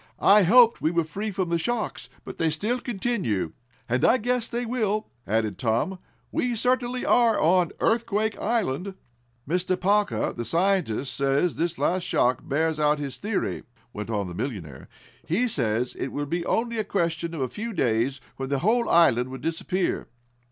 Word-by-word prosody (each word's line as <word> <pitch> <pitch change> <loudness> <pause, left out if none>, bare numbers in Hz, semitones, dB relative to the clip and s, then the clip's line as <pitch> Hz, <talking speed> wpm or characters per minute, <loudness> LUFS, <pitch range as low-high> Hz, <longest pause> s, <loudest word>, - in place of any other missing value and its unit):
I 205 +1 +6
hoped 230 +5 +6
we 155 - +2
were 170 0 +1
free 200 +8 -4
from 190 -3 -2
the 170 0 +1
shocks, 235 +5 -3 0.2
but - - -9
they 165 - +2
still 215 +11 -1
continue." 195 - -2 0.4
"And 125 +1 0
I 250 - +5
guess 245 0 -1
they 240 +1 -3
will," 220 -3 -1 0.2
added 110 0 0
Tom. 125 +11 0 0.3
"We 245 -1 0
certainly 250 +1 0
are 235 -2 +4
on 175 +1 +3
Earthquake 220 -2 +1
Island!" 200 - -1 0.5
"Mr. 180 +3 0
Parker, 205 +2 +1
the 120 - -4
scientist, 165 - 0
says 140 +5 +1
this 170 +1 -1
last 185 +1 +1
shock 125 -7 +1
bears 160 +2 0
out 150 0 +3
his 140 -4 -5
theory," 210 - -2 0.3
went 105 +1 -6
on 105 -4 -1
the 90 - -7
millionaire. 90 - -6 0.4
"He 220 +10 +1
says 120 - -1
it - - -4
will 145 +2 -3
be 170 +4 -3
only 230 0 0
a - - +1
question 170 -4 -1
of 150 - -4
a 130 - +1
few 220 - -5
days 130 - 0 0.2
when 135 0 -4
the 140 - +1
whole 235 +2 +2
island 130 -7 +4
will 130 - -6
disappear." 175 +5 -2
175 Hz, 175 wpm, -25 LUFS, 135-220 Hz, 0.5 s, I